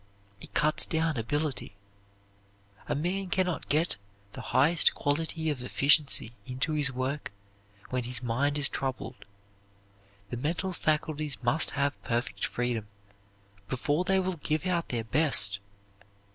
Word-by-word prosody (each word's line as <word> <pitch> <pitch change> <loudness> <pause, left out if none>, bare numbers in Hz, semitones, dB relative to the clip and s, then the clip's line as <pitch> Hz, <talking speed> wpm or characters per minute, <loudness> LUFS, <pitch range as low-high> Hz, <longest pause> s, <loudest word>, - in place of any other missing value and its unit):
It - - -13
cuts 155 +1 +2
down 160 -1 0
ability. 135 0 -2 1.1
A 145 - -1
man 180 +6 -2
can 185 +1 +2
not 180 -2 -4
get 155 +4 +1 0.3
the - - -8
highest 155 +5 +3
quality 160 +2 -1
of 135 -4 -5
efficiency 140 -2 +3
into 130 +5 -2
his 145 -2 +2
work 130 +3 -3 0.6
when 125 -1 -1
his 125 0 -2
mind 140 +5 0
is 145 -2 +5
troubled. 130 -2 -5 1.1
The 120 - -3
mental 170 +8 -2
faculties 155 -4 -1
must 125 +7 +4
have 140 0 -1
perfect 120 +1 -1
freedom 120 -3 -2 0.8
before 145 +6 0
they 190 +1 +2
will 185 -1 -2
give 155 +2 -2
out 175 -2 -1
their 115 -2 -2
best. 110 -7 +4
145 Hz, 130 wpm, -29 LUFS, 125-160 Hz, 1.1 s, is